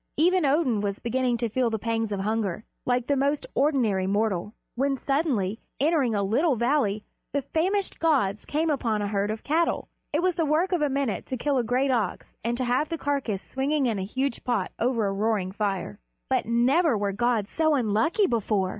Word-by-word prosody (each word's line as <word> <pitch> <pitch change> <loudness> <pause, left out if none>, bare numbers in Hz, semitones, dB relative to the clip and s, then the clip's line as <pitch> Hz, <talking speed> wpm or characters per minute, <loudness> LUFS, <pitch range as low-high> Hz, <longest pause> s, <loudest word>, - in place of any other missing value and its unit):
Even 350 0 +3
Odin 270 -7 +2
was 200 -1 -2
beginning 245 0 0
to 235 - -1
feel 240 +2 +1
the 225 - -1
pangs 225 0 -2
of 200 -1 -2
hunger, 210 -2 -1 0.2
like 245 -1 +1
the 285 - +1
most 280 +2 0
ordinary 235 -10 +2
mortal, 205 0 0 0.2
when 270 +2 0
suddenly, 250 - 0 0.2
entering 280 -6 +2
a 200 - +1
little 265 - +2
valley, 235 -4 +1 0.3
the 285 -1 0
famished 370 +8 -1
gods 250 -12 +1
came 315 +2 0
upon 225 -7 0
a - - -1
herd 200 0 0
of 215 +1 -4
cattle. 330 +3 0 0.2
It 310 +3 0
was 370 0 +3
the 335 -1 0
work 320 +6 +2
of 355 -4 +1
a 295 - +2
minute 270 -5 -1
to 260 - -3
kill 275 +2 +1
a - - +1
great 255 +4 +1
ox 225 -7 -2
and 235 +1 -1
to 255 - -1
have 250 +5 +1
the 330 - -2
carcass 270 -9 -2
swinging 275 +2 0
in 225 -5 0
a - - -2
huge 260 +5 -2
pot 230 -7 -1
over 235 -2 +1
a 195 - 0
roaring 200 -2 0
fire. 195 - -3 0.3
But - - +1
never 250 +4 +3
were 200 -1 -1
gods 225 0 0
so 315 -2 +2
unlucky 240 - +2
before! 210 - 0
245 Hz, 200 wpm, -26 LUFS, 210-285 Hz, 0.3 s, Even